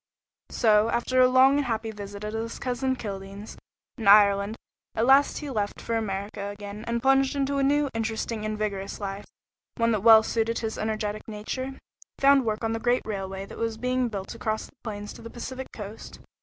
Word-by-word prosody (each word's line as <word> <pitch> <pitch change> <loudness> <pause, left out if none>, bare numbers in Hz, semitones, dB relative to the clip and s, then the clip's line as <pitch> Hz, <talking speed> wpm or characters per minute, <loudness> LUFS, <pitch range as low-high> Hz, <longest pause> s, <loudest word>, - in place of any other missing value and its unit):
So, 215 -1 +3
after 255 +2 +2
a 255 - +7
long 260 +2 +5
and 290 - 0
happy 225 -2 -2
visit 205 -1 -8
at 210 0 -4
his 225 +1 -4
cousin 260 +1 -1
Kildene's, 200 -2 -7 0.4
in 220 - -3
Ireland, 200 +1 +6 0.4
he - - -4
at 225 - +3
last 275 +3 +4
left 215 -8 -2
for 230 - -3
America 200 -2 -3
again, 205 +1 -8
and 235 0 -1
plunged 270 +1 +3
into 280 0 0
a - - +2
new, 290 +1 +3
interesting, 225 0 -2
and 215 0 -2
vigorous 200 -2 -3
life, 200 0 -5 0.5
one 230 0 +2
that 215 -3 0 0.2
suited 230 0 0
well - - -9
his 220 - -6
energetic 215 -1 -3
nature. 220 +4 -4
He - - -16 0.4
found 275 -2 +5
work 215 0 -2
on 225 - 0
the 225 - -2
great 245 +2 +1
railway 195 -2 -4
that - - -11
was 225 -1 -2
being 250 +1 0
built 195 -3 -5
across 220 -1 -2
the - - -16
plains 205 -2 -6
to - - -12
the 230 - -8
Pacific 260 +2 -6
Coast. 210 0 -9
220 Hz, 195 wpm, -26 LUFS, 205-250 Hz, 0.5 s, a